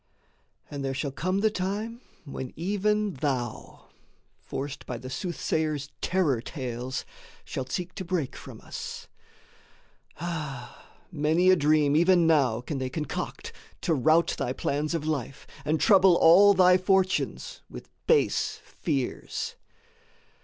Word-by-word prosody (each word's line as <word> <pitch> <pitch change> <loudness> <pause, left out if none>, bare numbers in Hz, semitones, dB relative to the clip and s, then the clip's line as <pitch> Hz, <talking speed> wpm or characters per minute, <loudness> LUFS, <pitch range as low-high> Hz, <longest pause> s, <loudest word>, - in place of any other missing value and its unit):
And 140 -1 -4
there 135 0 -2
shall 140 +1 -2
come 185 +7 -1
the 220 0 +3
time 210 +5 -3 0.2
when 130 -3 -6
even 205 +3 0
thou, 130 -5 -4 0.5
Forced 140 0 -6
by 125 - -4
the 130 +2 -8
soothsayer's 155 -4 -2
terror 160 -10 +1
tales, 125 -2 -5 0.4
shalt 130 0 -5
seek 180 0 -3
To - - -5
break 170 -6 -2
from - - -11
us. - - -7 1.1
Ah, 150 -7 -6 0.2
many 165 +3 +3
a - - +6
dream 150 -2 +3
even 175 +1 +5
now 135 -8 +3
Can 135 +2 -4
they 130 -1 -2
concoct 150 +2 -5 0.3
to 165 - +1
rout 155 +4 +3
thy 125 - -1
plans 150 +4 -1
of 155 -2 -3
life, 140 -4 -3 0.2
And 155 +2 0
trouble 190 -4 +6
all 195 +5 +7
thy 180 0 +6
fortunes 185 0 0
with - - -10 0.2
base 470 -2 +2
fears. 140 -6 -3
155 Hz, 130 wpm, -27 LUFS, 135-185 Hz, 1.1 s, all